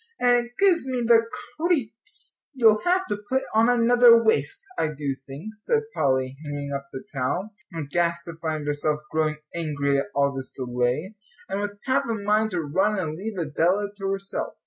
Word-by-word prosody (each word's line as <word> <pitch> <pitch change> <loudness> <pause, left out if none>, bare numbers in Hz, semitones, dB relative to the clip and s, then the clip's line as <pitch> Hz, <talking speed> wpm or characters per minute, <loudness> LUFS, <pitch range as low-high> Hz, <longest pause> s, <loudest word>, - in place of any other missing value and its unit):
and 245 -1 +4
it - - -21
gives 365 -8 +4
me 255 -2 -1
the 230 -1 +7 0.4
creeps." 335 - -2
"You'll 225 -5 +4
have 370 +1 +2
to 205 - -3
put 265 +1 +1
on 225 +2 +4
another 240 0 +6
waist, 390 - +1
I 160 - +1
do 145 -2 -3
think," 150 +11 -8
said 445 - +1
Polly, 130 -1 0
hanging 145 -1 -4
up 140 0 -4
the 130 - -7
towel, 145 +10 -2 0.3
aghast 170 +3 -1
to 170 - -7
find 155 -2 -2
herself 150 +1 0
growing 155 -1 0 0.2
angry 140 -4 0
at 140 - -3
all 140 0 +2
this 135 -1 -5
delay, 125 - -1 0.3
and 195 +1 -2
with 205 0 -4
half 260 - +2
a 230 - -1
mind 210 +1 +1
to 180 -4 -2
run 190 +8 +1
and 160 -5 -2
leave 205 +4 -5
Adela 175 +5 +1
to 195 -1 -3
herself. 195 0 -3
190 Hz, 180 wpm, -25 LUFS, 145-230 Hz, 0.4 s, the